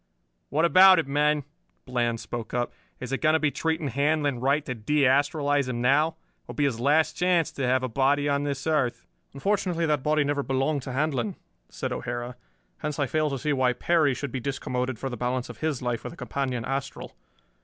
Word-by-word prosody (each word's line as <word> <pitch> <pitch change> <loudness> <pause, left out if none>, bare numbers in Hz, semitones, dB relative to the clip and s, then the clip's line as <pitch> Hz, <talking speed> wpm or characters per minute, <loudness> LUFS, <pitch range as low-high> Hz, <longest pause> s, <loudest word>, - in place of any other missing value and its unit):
"What 155 +5 +2
about 185 +2 +8
it, 165 - +1
men?" 150 +1 +2 0.4
Bland 120 -2 -1
spoke 120 0 -6
up. 120 0 -1 0.3
"Is 125 0 -6
it 135 - -2
going 155 -1 +4
to 160 - +3
be 150 -2 +1
treating 160 -2 -1
Handlon 145 0 +1
right 140 +4 +1
to 130 - -3
de 140 +6 0
astralize 145 0 +2
him 120 -1 -3
now? 140 +6 +4
It 165 - -8 0.3
will - - -8
be 145 - 0
his 130 -5 0
last 150 +5 +3
chance 175 -3 +2
to 135 -2 -2
have 130 +1 +2
a - - 0
body 140 +4 +1
on 140 0 +1
this 140 -2 -3
earth." 150 -6 0 0.3
"Unfortunately 180 +1 0
that 150 -4 +1
body 150 +2 +2
never 145 0 0
belonged 135 +2 0
to 130 - -6
Handlon," 130 -5 -1 0.3
said - - -4
O'Hara. 120 +1 -4 0.4
"Hence 150 -1 -3
I 140 - +1
fail 155 +3 0
to 135 - -3
see 150 +3 -1
why 130 -2 +2
Perry 150 +1 +2
should 140 -1 -5
be 130 - -4
discommoded 125 -2 -3
for 135 - -4
the 125 -2 -5
balance 125 +1 -2
of - - -10
his 155 -5 -2
life 120 -2 -2
with - - -6
a - - -15
companion 130 -8 -3
astral. 135 0 -4
140 Hz, 210 wpm, -26 LUFS, 125-150 Hz, 0.4 s, about